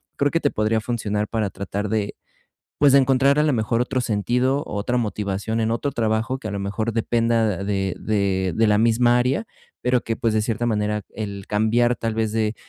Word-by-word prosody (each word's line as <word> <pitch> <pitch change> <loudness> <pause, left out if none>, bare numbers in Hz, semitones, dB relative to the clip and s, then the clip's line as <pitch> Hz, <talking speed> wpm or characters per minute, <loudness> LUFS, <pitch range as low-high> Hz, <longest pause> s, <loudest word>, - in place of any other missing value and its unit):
creo 145 0 +1
que 165 - +1
te 145 - +1
podría 110 +1 +1
funcionar 105 -2 -2
para 110 -3 -2
tratar 100 +1 -4
de, 105 -1 -1 0.6
pues, 145 -2 +5
de - - +8
encontrar 135 +1 +3
a - - +4
la 150 -1 +2
mejor 115 0 +1
otro 130 +1 -1
sentido, 125 +5 0
otra 105 +4 -2
motivación 105 -1 -2
en 110 0 0
otro 130 +5 -1
trabajo 115 +2 0
que 110 - -6
a - - -4
lo 100 - -3
mejor 105 +3 -2
dependa 115 -3 +1
de 95 -2 -1
de 95 -3 0
de 115 - +3
la 105 -1 +3
misma 120 +2 +4
área, 130 - 0 0.4
pero 125 0 +2
que, 115 - -3
pues, 115 - 0
de 110 - +2
cierta 115 +2 -2
manera 105 -2 0
el 100 -3 -6
cambiar 115 +3 +2
tal 115 -2 -3
vez 110 -1 -1
de, 110 -1 0
110 Hz, 205 wpm, -22 LUFS, 105-120 Hz, 0.6 s, de